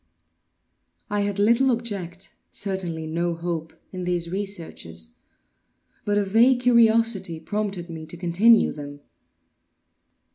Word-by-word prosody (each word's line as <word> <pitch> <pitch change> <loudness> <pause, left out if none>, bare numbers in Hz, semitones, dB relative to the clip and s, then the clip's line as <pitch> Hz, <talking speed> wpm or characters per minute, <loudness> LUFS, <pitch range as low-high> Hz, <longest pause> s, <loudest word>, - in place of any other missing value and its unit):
I 205 0 +1
had 200 -1 -1
little 235 +6 +4
object—certainly 190 -5 -3
no 170 +2 -1
hope—in 170 +2 -6
these 175 -1 -1
researches; 165 - -5 1.0
but 205 0 +1
a 205 - +3
vague 240 +5 +4
curiosity 230 -7 +3
prompted 195 +1 -3
me 160 -2 -8
to 175 - -8
continue 190 +7 +4
them. 145 -1 -9
190 Hz, 100 wpm, -24 LUFS, 170-215 Hz, 1.0 s, little